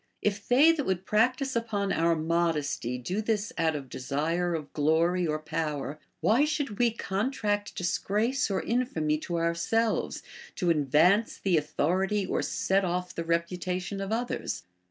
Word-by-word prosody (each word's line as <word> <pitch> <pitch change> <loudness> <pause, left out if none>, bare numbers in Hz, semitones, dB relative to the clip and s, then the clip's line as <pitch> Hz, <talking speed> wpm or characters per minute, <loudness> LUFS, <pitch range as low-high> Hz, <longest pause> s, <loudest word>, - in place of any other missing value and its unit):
If 200 -1 -1
they 280 +7 +6
that 305 -4 -1
would 190 -1 -1
prac 230 +6 +3
tise 270 -1 -3
upon 210 -4 -1
our 165 0 +2
modesty 155 -6 0
do 180 - -2
this 220 +2 -1
out 160 -2 +1
of 140 -3 -5
desire 160 +7 -1
of 150 -3 -6
glory 165 +4 +2
or 155 0 0
power, 155 -2 -3 0.2
Avhy 255 +8 +4
should 290 -5 -1
Ave 235 +3 +2
contract 205 -1 -2
disgrace 215 +8 0
or 195 - -1
infamy 160 -11 0
to 175 +2 -4
our 170 0 +1
selves, 225 +6 0 0.3
to 175 -3 +1
advance 160 - +3
the 190 -3 +1
authority 185 +7 +1
or - - -1
set 195 +1 +1
off 180 0 -2
the 165 - -3
reputation 180 +3 -2
of 195 +1 -4
others 240 +2 -2
180 Hz, 155 wpm, -28 LUFS, 165-215 Hz, 0.3 s, they